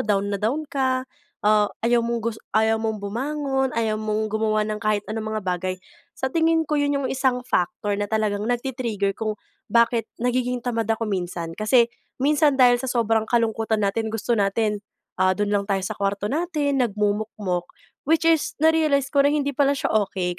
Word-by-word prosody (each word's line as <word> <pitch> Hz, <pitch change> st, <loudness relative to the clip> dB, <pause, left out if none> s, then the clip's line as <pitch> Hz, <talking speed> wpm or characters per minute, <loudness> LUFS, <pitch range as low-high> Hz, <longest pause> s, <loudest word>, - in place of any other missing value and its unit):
down 205 Hz, -1 st, 0 dB
na 200 Hz, -, -2 dB
down 275 Hz, +9 st, 0 dB
ka. 260 Hz, -2 st, -1 dB, 0.4 s
Ah, 210 Hz, 0 st, +4 dB, 0.2 s
ayaw 235 Hz, 0 st, +2 dB
mong 235 Hz, -1 st, -2 dB
gus 230 Hz, -1 st, -3 dB, 0.2 s
ayaw 220 Hz, 0 st, +3 dB
mong 220 Hz, -2 st, -3 dB
bumangon, 265 Hz, +4 st, -1 dB
ayaw 220 Hz, -2 st, 0 dB
mong 215 Hz, 0 st, -1 dB
gumawa 215 Hz, 0 st, +1 dB
ng 215 Hz, 0 st, -3 dB
kahit 215 Hz, -2 st, 0 dB
anong 215 Hz, 0 st, -3 dB
mga 215 Hz, -, -3 dB
bagay. 185 Hz, 0 st, -2 dB, 0.4 s
Sa 265 Hz, 0 st, -3 dB
tingin 325 Hz, +1 st, +2 dB
ko 300 Hz, -1 st, -1 dB
'yon 285 Hz, 0 st, +1 dB
yung 260 Hz, -, -1 dB
isang 260 Hz, -2 st, 0 dB
factor 200 Hz, -1 st, -1 dB
na 205 Hz, -, -1 dB
talagang 210 Hz, -1 st, -1 dB
nagti-trigger 240 Hz, -5 st, -1 dB
kung 215 Hz, +1 st, -3 dB, 0.3 s
bakit 235 Hz, -1 st, +2 dB, 0.2 s
nagiging 250 Hz, 0 st, 0 dB
tamad 230 Hz, -3 st, -1 dB
ako 225 Hz, 0 st, 0 dB
minsan 180 Hz, -5 st, -3 dB
kasi 230 Hz, +2 st, +4 dB, 0.3 s
minsan 295 Hz, 0 st, +3 dB
dahil 250 Hz, -2 st, +5 dB
sa 260 Hz, -, -4 dB
sobrang 225 Hz, -3 st, +1 dB
kalungkutan 225 Hz, -2 st, 0 dB
natin 210 Hz, +3 st, 0 dB
gusto 225 Hz, +1 st, -1 dB
natin, 210 Hz, +1 st, +1 dB, 0.4 s
ah, 185 Hz, 0 st, +3 dB
don 205 Hz, +2 st, -1 dB
lang 200 Hz, -1 st, 0 dB
tayo 195 Hz, -2 st, 0 dB
sa 210 Hz, +3 st, -4 dB
kuwarto 200 Hz, +1 st, -1 dB
natin, 295 Hz, -2 st, 0 dB
nagmumukmok, 210 Hz, -5 st, -1 dB, 0.4 s
which 325 Hz, +1 st, +3 dB
is 325 Hz, -2 st, +2 dB
na-realize 310 Hz, -4 st, +3 dB
ko 280 Hz, -1 st, +4 dB
na 290 Hz, -, +2 dB
hindi 285 Hz, -1 st, 0 dB
pala 280 Hz, 0 st, +2 dB
siya 275 Hz, -, -2 dB
okey 185 Hz, -4 st, 0 dB
225 Hz, 180 wpm, -23 LUFS, 210-260 Hz, 0.4 s, dahil